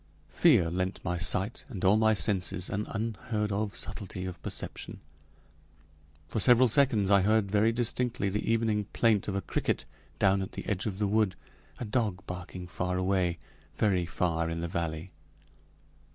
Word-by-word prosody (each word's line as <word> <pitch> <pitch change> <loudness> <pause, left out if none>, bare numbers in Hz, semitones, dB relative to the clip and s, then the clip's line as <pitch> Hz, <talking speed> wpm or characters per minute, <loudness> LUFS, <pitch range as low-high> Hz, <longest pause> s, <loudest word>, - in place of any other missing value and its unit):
Fear 115 - +4
lent 95 +2 -2
my 90 -1 -1
sight, 95 +6 0
and 100 -7 -4
all 95 +3 +6
my 110 0 +4
senses, 90 -3 +1
an 105 +1 -2
unheard 110 0 -2
of 100 +1 -2
subtlety 95 -1 -5
of 90 -2 -7
perception. - - -6 1.3
For 90 - -2
several 125 +2 +6
seconds 115 -6 +3
I 100 -1 +6
heard 105 0 +2
very 105 +2 +3
distinctly 120 -2 -1
the 105 +3 -1
evening 110 -2 +1
plaint 110 -4 +2
of 100 - -2
a 100 - 0
cricket - - -2 0.3
down 95 0 +3
at 95 - -6
the - - -6
edge 100 0 -1
of 95 -3 -3
the 105 - 0
wood, 105 -2 +1 0.4
a 120 - -5
dog 105 -4 -1
barking 90 0 -7
far 90 +1 -2
away, 90 -2 +1 0.4
very 95 -5 +1
far 85 -2 -1
in 85 0 -3
the 85 - -2
valley. 85 +1 -4
100 Hz, 165 wpm, -29 LUFS, 90-110 Hz, 1.3 s, all